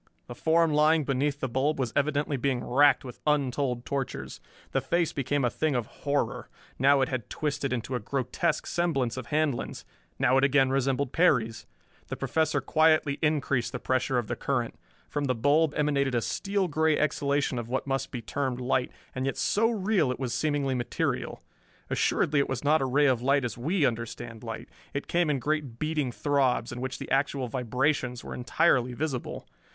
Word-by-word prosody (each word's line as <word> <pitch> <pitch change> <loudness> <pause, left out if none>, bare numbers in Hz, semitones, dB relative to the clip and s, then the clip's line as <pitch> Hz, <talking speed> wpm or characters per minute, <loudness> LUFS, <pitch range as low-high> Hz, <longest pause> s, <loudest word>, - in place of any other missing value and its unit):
The 120 - -8
form 165 +3 +2
lying 155 +1 +4
beneath 140 +1 0
the 130 - 0
bulb 130 +5 0
was 130 -4 -2
evidently 145 0 +1
being 130 -1 -1
racked 140 +2 +4
with 125 - -9
untold 135 -4 0
tortures. 125 - -4 0.3
The 135 - +1
face 170 +5 0
became 140 0 0
a - - +3
thing 155 -3 0
of 120 -2 0
horror. 140 -1 -2 0.3
Now 140 +1 +5
it 130 - +1
had 130 -4 -4
twisted 145 -3 -2
into 125 +1 -3
a 125 - 0
grotesque 135 +7 -1
semblance 135 -9 0
of 130 -3 -6
Handlon's 150 -4 -1 0.3
now 130 +2 +3
it - - 0
again 135 -1 +4
resembled 135 0 0
Perry's. 115 -10 +2 0.4
The - - -4
Professor 155 -3 0
quietly 155 0 +3
increased 145 -5 0
the - - -3
pressure 130 0 0
of 120 - 0
the - - -3
current. - - -1 0.3
From 145 -1 -2
the 130 -2 +1
bulb 145 +6 +2
emanated 140 -3 +1
a 120 - +2
steel 195 -1 -1
gray 160 -1 +2
exhalation 140 -3 0
of 115 -1 -6
what 130 - -1
must 135 -1 -2
be 120 -2 -6
termed 130 -2 -2
light, 125 0 0 0.2
and 130 +1 -2
yet 135 - -2
so 225 +2 +2
real 195 - +1
it 125 - -5
was 125 -3 -2
seemingly 145 -3 0
material. 120 -2 -2 0.5
Assuredly 145 -1 +2
it 140 - +1
was 130 0 -3
not 150 +1 +3
a - - +1
ray 140 +3 +3
of 130 -4 +3
light 135 +1 +2
as 120 - -3
we 155 +6 +1
understand 115 -1 -4
light. 115 -1 -6 0.3
It 140 - -2
came 170 -2 +1
in 145 - +2
great 145 -2 -2
beating 155 -3 -1
throbs, 135 -3 +1
in 120 +1 -6
which 130 0 -3
the - - -8
actual 135 -1 +1
vibrations 125 +1 -1
were - - -7
entirely 125 -1 +2
visible. 130 -1 -4
135 Hz, 185 wpm, -28 LUFS, 125-150 Hz, 0.5 s, Now